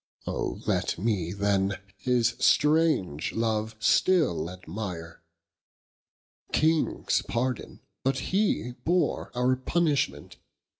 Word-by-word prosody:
Oh -, -, -3 dB
let -, -, 0 dB
mee 95 Hz, -4 st, -1 dB
then, 100 Hz, 0 st, +1 dB, 0.2 s
his 120 Hz, -2 st, +1 dB
strange 150 Hz, -, +2 dB
love 110 Hz, -1 st, -1 dB
still 110 Hz, -, +2 dB
admire: 90 Hz, -2 st, -7 dB, 1.3 s
Kings 160 Hz, 0 st, +2 dB
pardon, 125 Hz, +1 st, -2 dB, 0.2 s
but 135 Hz, 0 st, +1 dB, 0.2 s
he 195 Hz, -, +1 dB
bore 180 Hz, +2 st, +1 dB
our 125 Hz, +1 st, +2 dB
punishment. 135 Hz, -, -1 dB
115 Hz, 90 wpm, -27 LUFS, 95-145 Hz, 1.3 s, strange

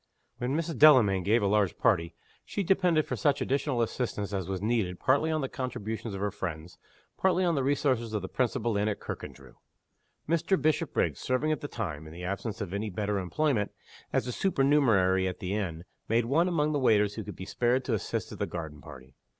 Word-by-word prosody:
When 130 Hz, +4 st, -1 dB
Mrs. 165 Hz, -1 st, -3 dB
Delamayn 120 Hz, -11 st, +7 dB
gave 105 Hz, +4 st, +2 dB
a -, -, +2 dB
large 100 Hz, -1 st, +2 dB
party, 85 Hz, -8 st, +1 dB, 0.3 s
she 200 Hz, -, -3 dB
depended 180 Hz, -4 st, +3 dB
for -, -, -3 dB
such 145 Hz, -3 st, +1 dB
additional 135 Hz, -3 st, 0 dB
assistance 105 Hz, -4 st, -3 dB
as 95 Hz, -2 st, -3 dB
was 95 Hz, -1 st, -2 dB
needed 105 Hz, -4 st, -1 dB
partly 140 Hz, +5 st, +2 dB
on 155 Hz, -1 st, 0 dB
the 135 Hz, -, -1 dB
contributions 110 Hz, -5 st, -4 dB
of 95 Hz, -, -5 dB
her 105 Hz, 0 st, 0 dB
friends, 85 Hz, -4 st, -6 dB, 0.4 s
partly 185 Hz, -1 st, +3 dB
on 170 Hz, -, +2 dB
the 140 Hz, -, +1 dB
resources 130 Hz, -4 st, +1 dB
of 105 Hz, -3 st, -2 dB
the -, -, -3 dB
principal 120 Hz, -2 st, -1 dB
inn 105 Hz, +1 st, +1 dB
at 105 Hz, -, -2 dB
Kirkandrew. -, -, -8 dB, 0.7 s
Mr. 170 Hz, +3 st, +1 dB
Bishopriggs, 155 Hz, +1 st, 0 dB
serving 130 Hz, +5 st, 0 dB
at 155 Hz, -, -1 dB
the 145 Hz, -, -4 dB
time 80 Hz, -, -5 dB
(in 80 Hz, -, -11 dB
the 90 Hz, +2 st, -9 dB
absence 100 Hz, +4 st, -4 dB
of 95 Hz, -3 st, -4 dB
any 105 Hz, +2 st, -2 dB
better 105 Hz, +1 st, -1 dB
employment) 105 Hz, -, 0 dB, 0.4 s
as -, -, +1 dB
a 125 Hz, -, -3 dB
supernumerary 120 Hz, -, +3 dB
at 90 Hz, -, -4 dB
the 95 Hz, -2 st, -4 dB
inn, 85 Hz, -6 st, -3 dB, 0.3 s
made 115 Hz, +1 st, +2 dB
one 155 Hz, +8 st, +2 dB
among 155 Hz, -4 st, +1 dB
the 145 Hz, -, 0 dB
waiters 105 Hz, -5 st, +3 dB
who 110 Hz, -, -5 dB
could -, -, -8 dB
be 95 Hz, -, -7 dB
spared 125 Hz, +5 st, +1 dB
to 125 Hz, -, -1 dB
assist 110 Hz, -, -2 dB
at -, -, -9 dB
the -, -, -1 dB
garden 80 Hz, -4 st, -6 dB
party. 65 Hz, -3 st, -12 dB
115 Hz, 205 wpm, -29 LUFS, 95-140 Hz, 0.7 s, Delamayn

